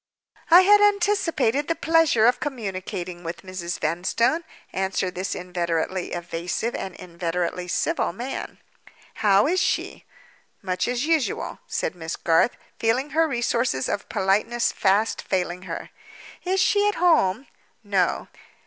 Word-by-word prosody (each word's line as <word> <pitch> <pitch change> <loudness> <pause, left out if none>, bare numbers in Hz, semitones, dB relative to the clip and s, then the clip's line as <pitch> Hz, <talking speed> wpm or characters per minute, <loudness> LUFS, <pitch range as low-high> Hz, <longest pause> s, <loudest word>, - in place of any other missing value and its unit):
"I 350 +2 +9
had 410 +2 +6
anticipated 375 - +2
the 330 - 0
pleasure 325 -10 +3
of 245 +1 +4
communicating 185 -9 -5
with 165 +1 -6
Mrs. 185 -2 -5
Vanstone," 190 - 0 0.3
answered 190 -1 -1
this 185 +2 -3
inveterately 175 0 -2
evasive 175 +6 -3
and 190 - -5
inveterately 175 0 -3
civil 175 - 0
man. 245 +9 -6 0.6
"How 200 -1 +5
is 360 +5 +2
she?" - - -1 0.6
"Much 185 +2 -1
as 245 +3 -1
usual," 320 -5 0
said - - -2
Miss 165 -2 -5
Garth, 165 +8 +2 0.2
feeling 250 +6 +1
her 325 +1 +3
resources 240 - 0
of 200 - -3
politeness 210 +5 +1
fast 205 +3 +1
failing 180 -1 -2
her. - - -6 0.5
"Is 380 +1 +1
she 410 +2 +3
at 415 - +1
home?" 280 - +3 0.4
"No." 195 -4 0
200 Hz, 130 wpm, -24 LUFS, 180-290 Hz, 0.6 s, I